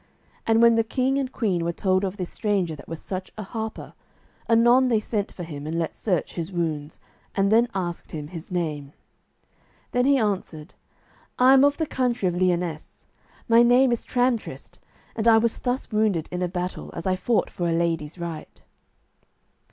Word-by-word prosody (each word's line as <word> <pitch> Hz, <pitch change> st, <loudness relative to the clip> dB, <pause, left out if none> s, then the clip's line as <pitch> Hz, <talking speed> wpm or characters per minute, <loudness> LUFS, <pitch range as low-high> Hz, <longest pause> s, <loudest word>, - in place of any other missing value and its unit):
And 225 Hz, +1 st, +4 dB
when 235 Hz, 0 st, +7 dB
the 225 Hz, 0 st, +3 dB
king 260 Hz, +4 st, 0 dB
and 260 Hz, -2 st, -3 dB
queen 190 Hz, -10 st, 0 dB
were 170 Hz, -, 0 dB
told 185 Hz, +2 st, +1 dB
of 195 Hz, +1 st, -3 dB
this 180 Hz, -3 st, -5 dB
stranger 195 Hz, -7 st, -1 dB
that -, -, -13 dB
was 165 Hz, -1 st, -6 dB
such 185 Hz, -1 st, -6 dB
a 215 Hz, -, -4 dB
harper, 220 Hz, +2 st, -6 dB, 0.6 s
anon 240 Hz, +3 st, +5 dB
they 230 Hz, -3 st, +3 dB
sent 210 Hz, -1 st, -3 dB
for 180 Hz, -, -8 dB
him 150 Hz, -3 st, -7 dB
and 165 Hz, +1 st, -2 dB
let 165 Hz, -1 st, -2 dB
search 185 Hz, -7 st, -2 dB
his 170 Hz, +1 st, -4 dB
wounds, 155 Hz, -4 st, -3 dB, 0.4 s
and 195 Hz, +1 st, +2 dB
then 230 Hz, +2 st, +5 dB
asked 175 Hz, -3 st, -4 dB
him 150 Hz, -2 st, -6 dB
his 165 Hz, -2 st, -9 dB
name. 150 Hz, -5 st, -3 dB, 1.0 s
Then 245 Hz, 0 st, +2 dB
he 280 Hz, 0 st, +4 dB
answered, 190 Hz, -7 st, -2 dB, 0.6 s
"I 255 Hz, +1 st, +6 dB
am 270 Hz, 0 st, +6 dB
of 285 Hz, 0 st, +3 dB
the 320 Hz, -, 0 dB
country 245 Hz, -8 st, 0 dB
of 175 Hz, -, 0 dB
Lyonesse; 175 Hz, -3 st, -2 dB, 0.4 s
my 230 Hz, 0 st, +6 dB
name 245 Hz, +2 st, +5 dB
is 235 Hz, -, -1 dB
Tramtrist, 245 Hz, -2 st, -2 dB, 0.4 s
and 225 Hz, 0 st, -1 dB
I 225 Hz, -1 st, +7 dB
was 225 Hz, 0 st, +1 dB
thus 250 Hz, 0 st, -2 dB
wounded 210 Hz, -7 st, +1 dB
in 180 Hz, -, -3 dB
a 180 Hz, -, +1 dB
battle, 180 Hz, +1 st, -4 dB
as 165 Hz, -, -6 dB
I 185 Hz, -1 st, +2 dB
fought 225 Hz, +4 st, 0 dB
for 175 Hz, -1 st, -2 dB
a -, -, +1 dB
lady's 165 Hz, -1 st, -1 dB
right." 170 Hz, -3 st, -7 dB
195 Hz, 185 wpm, -24 LUFS, 170-235 Hz, 1.0 s, when